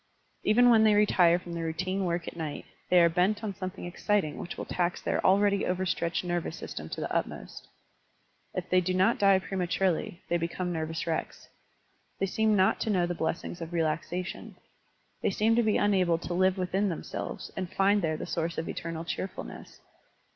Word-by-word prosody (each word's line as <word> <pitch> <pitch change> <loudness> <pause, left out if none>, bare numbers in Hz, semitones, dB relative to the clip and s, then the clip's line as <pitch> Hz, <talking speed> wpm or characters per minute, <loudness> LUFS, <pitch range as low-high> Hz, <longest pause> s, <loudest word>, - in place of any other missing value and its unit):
Even 245 +3 +5
when 220 -2 +6
they 215 -1 +5
retire 180 -5 +5
from 175 -1 -8
their 165 -1 -3
routine 185 +4 -2
work 170 -1 -2
at - - -6
night, 155 -3 -5 0.2
they 180 - +6
are 170 - +7
bent 185 +6 +1
on 210 -2 -2
something 185 -1 -6
exciting 175 -2 -1
which 175 - -6
will - - -4
tax 175 0 -1
their - - -1
already 200 +1 +4
over 185 +1 -1
stretched 170 -1 -1
nervous 175 -2 -2
system - - -7
to - - -5
the - - -3
utmost. - - -4 0.9
If 185 -1 -3
they 185 0 +5
do 185 +1 -1
not 190 +6 +3
die 195 -1 +6
prematurely, 185 -1 -1
they 175 - +1
become 175 +2 -3
nervous 160 0 -3
wrecks. 165 -1 -4 0.7
They - - 0
seem 215 +2 +2
not 190 -1 +3
to - - -2
know 185 -4 +2
the 175 - -2
blessings 165 +1 -3
of 165 +1 -6
relaxation. 165 +2 -2 0.7
They - - +2
seem 215 +3 +2
to 240 - +4
be 215 -2 +2
unable 185 -5 +3
to 175 +1 -5
live 185 +1 +2
within 190 +2 0
themselves 165 - -5
and 185 -2 -4
find 200 +1 +3
there 155 -2 0
the - - -5
source 165 -1 -2
of 160 - -3
eternal 165 0 -5
cheerfulness. 185 +2 -6
180 Hz, 190 wpm, -29 LUFS, 170-195 Hz, 0.9 s, are